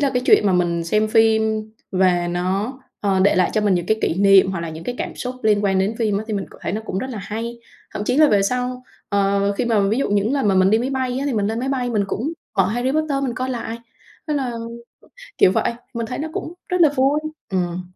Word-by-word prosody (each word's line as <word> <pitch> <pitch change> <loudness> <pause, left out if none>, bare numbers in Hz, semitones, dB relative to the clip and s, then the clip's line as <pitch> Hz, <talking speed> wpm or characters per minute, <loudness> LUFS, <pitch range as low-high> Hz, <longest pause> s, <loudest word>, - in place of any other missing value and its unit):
là 280 -2 +2
cái 250 - +1
chuyện 210 - +5
mà 190 - +3
mình 170 -2 +1
xem 215 +5 +1
phim 220 -1 +2 0.2
và 180 -2 +2
nó, 190 +8 -2 0.2
ờ, 195 -2 +1
để 200 - +4
lại 185 - +3
cho 215 - +1
mình 205 -3 +2
những 175 0 -1
cái 220 0 +1
kỷ - - +1
niệm 195 0 +5
hoặc 190 -3 -3
là 165 -1 -4
những 160 +1 -9
cái 245 - -3
cảm - - -4
xúc 250 0 -4
liên 210 -1 +2
quan 190 -1 +2
đến 195 +4 0
phim 210 -3 +1
á, 215 - -5
thì 215 - -2
mình 195 - -3
cảm - - -15
thấy - - -2
nó 215 - -2
cũng 190 - -3
rất 260 +4 -4
là 220 - -5
hay. 230 +4 -5 0.4
Thậm 205 - -3
chí 250 - 0
là 305 -1 +6
về 200 -2 +3
sau, 250 +3 -2 0.3
ờ, 200 0 +1
khi 200 - -2
mà 225 -3 +2
ví 220 +5 +1
dụ 275 - 0
những 205 +5 +1
lần 270 -7 +1
mà 195 - +3
mình 185 +1 +4
đi 220 - +4
máy 255 +3 -2
bay 260 -1 -1
á 280 - -2
thì 275 - 0
mình 205 -2 +1
lên 225 +2 -2
máy 265 - -2
bay 250 -3 -1
mình 210 -3 +1
cũng 280 +10 -2 0.3
mở 185 - +5
"Harry 245 +5 -1
Potter" 300 -3 0
mình 240 -3 -2
coi 255 +2 -3
lại. 230 -2 -4 0.5
Thế 300 - 0
là 260 -4 -1 0.9
kiểu 185 - +6
vậy, - - +1 0.2
mình 230 -1 -2
thấy 250 - -5
nó 315 +2 -3
cũng 335 - -5
rất 360 -1 0
là 320 - +7
vui. 275 +3 +3 0.3
Ừm. 180 -1 -1
215 Hz, 270 wpm, -21 LUFS, 195-250 Hz, 0.9 s, là